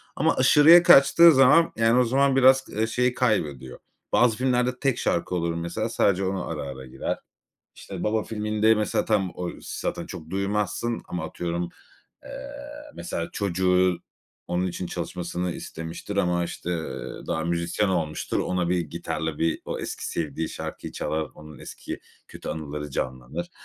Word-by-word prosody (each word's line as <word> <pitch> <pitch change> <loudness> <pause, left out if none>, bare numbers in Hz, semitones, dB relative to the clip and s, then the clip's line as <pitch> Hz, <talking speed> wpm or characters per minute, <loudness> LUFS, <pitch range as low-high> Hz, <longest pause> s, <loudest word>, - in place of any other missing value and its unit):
Ama - - +2
aşırıya 165 +4 +7
kaçtığı 170 +3 +8
zaman, 140 +5 +6
yani, 115 +2 +3
o - - +5
zaman 135 +3 +2
biraz, 130 0 +6
ııı, 110 +2 -1
şeyi 125 +2 +1
kaybediyor. 75 - -1 0.3
Bazı 120 -3 +4
filmlerde 125 -1 +1
tek 135 -4 +1
şarkı 85 +1 -1
olur 85 -1 0
mesela 85 +7 -3
sadece 100 -4 +2
ona 95 -1 -2
ara, 80 -2 -4
ara 65 -1 -7
girer. 65 - -4 0.6
İşte, - - -7
"Baba" 110 0 +1
filminde 110 0 +1
mesela 105 0 0
tam 100 -4 +1
o 90 -1 -3
zaten - - -4
çok 80 0 -9
duymazsın 105 +4 -1
ama 85 -3 -4
atıyorum, 85 +1 -3 0.6
eee, - - -10 0.6
mesela 85 - -4
çocuğu 90 -2 +2 0.5
onun 90 +1 0
için 90 0 -4
çalışmasını 90 0 -4
istemiştir 80 +6 -7
ama, 90 -2 +1
işte, 90 - -6
eee, 80 -2 -5
daha 80 -1 -1
müzisyen 85 +4 0
olmuştur. 80 -5 -1
Ona 90 -2 -1
bir 90 -1 +1
gitarla 80 -1 -4
bir 80 0 0
o - - -4
eski - - -5
sevdiği 80 0 -3
şarkıyı - - -7
çalar. 80 -1 -2
Onun 75 -1 -12
eski - - -8 0.3
kötü - - -9
anıları 75 -2 -5
canlanır. 65 +6 -4
90 Hz, 150 wpm, -25 LUFS, 85-110 Hz, 0.6 s, kaçtığı